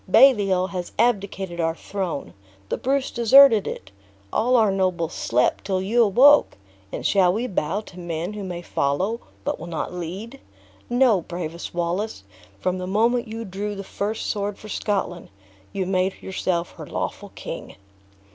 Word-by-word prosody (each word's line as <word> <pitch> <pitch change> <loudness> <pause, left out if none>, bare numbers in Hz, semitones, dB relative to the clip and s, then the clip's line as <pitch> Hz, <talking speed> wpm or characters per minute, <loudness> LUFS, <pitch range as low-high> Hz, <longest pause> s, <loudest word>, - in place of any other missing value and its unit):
Baliol 195 -7 +5
has 180 -2 -5
abdicated 195 -6 0
our 165 -1 +1
throne; 185 -5 -4 0.4
the - - -1
Bruce 270 +1 0
deserted 235 -2 +6
it; 95 +1 -6 0.4
all 250 +3 +3
our 220 -4 +4
nobles 185 -4 0
slept 125 +2 +1
till 190 -2 0
you 215 +6 +2
awoke; 255 +8 +6 0.3
and - - -5
shall 190 -3 +4
we 225 +6 -1
bow 195 -2 -1
to 185 -4 -13
men 170 +2 -4
who 210 -1 -6
may 175 -2 -5
follow, 180 +12 0 0.2
but - - -2
will 165 - -7
not 170 +1 -4
lead? 190 +9 -6 0.5
No, 240 -6 +4
bravest 170 0 -6
Wallace, 175 - -2 0.4
from 185 - -1
the 180 - -4
moment 230 +5 +2
you 225 +1 -6
drew 205 +2 -4
the 195 - -6
first 210 +3 -3
sword 205 -1 -2
for 215 - -11
Scotland, 195 -5 -2 0.4
you 190 -1 -2
made 185 0 0
yourself 180 -2 -2
her - - -8
lawful - - -4
king." - - -7
195 Hz, 155 wpm, -23 LUFS, 175-220 Hz, 0.5 s, deserted